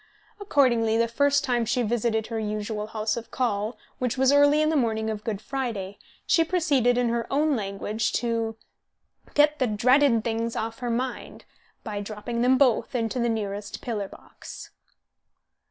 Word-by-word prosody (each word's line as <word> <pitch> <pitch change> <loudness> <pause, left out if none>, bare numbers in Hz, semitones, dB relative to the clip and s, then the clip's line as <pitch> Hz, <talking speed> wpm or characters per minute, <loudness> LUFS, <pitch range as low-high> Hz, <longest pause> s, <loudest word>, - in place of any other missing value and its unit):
Accordingly, 240 - +2
the 230 0 +2
first 285 +5 +2
time 245 -4 +1
she 240 +2 0
visited 220 -1 0
her 225 0 -4
usual 210 0 -3
house 215 0 -2
of 235 - -7
call, 220 -2 -1 0.2
which 250 0 -1
was 265 +1 +4
early 290 +1 +5
on 310 - +2
the 320 - +1
morning 220 -4 0
of 210 -1 -6
Good 215 -4 -3
Friday, 215 -6 -4 0.3
she 330 - +4
proceeded, 285 -8 +2
in 245 -1 +2
her 235 0 -2
own 295 +1 +2
language, 205 +1 -2
to 230 -2 -1 0.8
"get 300 +1 +4
the 255 - +2
dratted 235 +2 +3
things 230 0 -2
off 225 +1 -4
her 245 -1 -3
mind" 245 +1 -4 0.4
by 205 -2 -4
dropping 215 +3 -4
them 255 +2 +4
both 255 -1 +2
into 230 +1 -1
the 235 0 +1
nearest 205 -2 -3
pillar 210 -5 -3
box. - - -12
230 Hz, 165 wpm, -26 LUFS, 220-260 Hz, 0.8 s, early